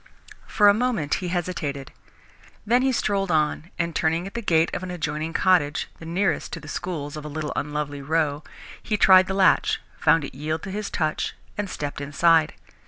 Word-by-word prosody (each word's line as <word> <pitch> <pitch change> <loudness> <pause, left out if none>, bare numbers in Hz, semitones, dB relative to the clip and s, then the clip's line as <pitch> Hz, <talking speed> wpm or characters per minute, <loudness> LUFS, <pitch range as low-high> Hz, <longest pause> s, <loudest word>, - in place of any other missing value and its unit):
For 210 - +4
a 205 - +8
moment 220 -10 0
he 180 - -3
hesitated. 170 -6 -3 0.7
Then 240 +4 +3
he 265 0 +2
strolled 200 -5 0
on, 155 +1 0
and, 170 -1 -2
turning 165 +2 +1
at 195 - -8
the 235 - -3
gate 165 -5 +2
of - - -3
an 185 - -6
adjoining 155 -2 -3
cottage, 165 -5 +2
the 160 - -9
nearest 185 +3 0
to 165 - -4
the 155 - -12
schools 155 -3 -4
of 150 - -7
a - - -6
little 150 0 -4
unlovely 145 -1 -3
row, 150 0 0 0.4
he 215 - -1
tried 185 -2 +7
the 190 - -2
latch, 195 -1 +3 0.2
found 155 0 +4
it - - -9
yield 155 +4 -3
to 195 - -6
his 210 +1 -4
touch, 155 -2 -2 0.2
and 205 -2 -3
stepped 145 -4 -5
inside. 155 +3 +3
165 Hz, 190 wpm, -24 LUFS, 150-190 Hz, 0.7 s, a